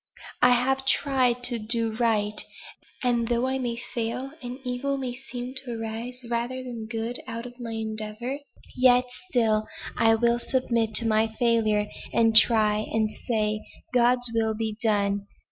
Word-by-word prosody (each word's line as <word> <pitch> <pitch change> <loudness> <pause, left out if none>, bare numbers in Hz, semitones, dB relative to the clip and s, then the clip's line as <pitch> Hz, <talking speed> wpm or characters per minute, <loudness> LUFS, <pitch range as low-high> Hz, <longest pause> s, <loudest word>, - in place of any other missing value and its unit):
I 250 0 +7
have 265 +2 +1
tried 255 -3 +2
to 245 -1 0
do 225 0 0
right, 215 -3 +1 0.6
and 240 -2 +2
though 240 +1 +1
I 265 0 0
may 240 -2 -2
fail, 235 +3 -4
and 245 0 -6
evil 265 +2 -1
may 255 -2 -3
seem 250 0 -7
to 240 -3 -5
arise 235 +3 -5
rather 240 +2 -2
than 235 -3 -6
good 225 +2 -3
out 230 +1 -5
of 245 0 -11
my 230 -2 -5
endeavor, 220 +4 -4 0.4
yet 250 0 +5 0.2
still 220 -5 +2 0.3
I 225 0 +4
will 235 +1 +2
submit 235 -4 0
to 230 - +4
my 220 0 +3
failure, 220 -2 +2 0.3
and 225 -1 +3
try 215 -2 +6
and 220 -1 +1 0.2
say 215 -2 0 0.3
'God's 245 0 +3
will 220 -1 +1
be 220 -1 -2
done!' 200 -2 +1
235 Hz, 155 wpm, -26 LUFS, 220-250 Hz, 0.6 s, I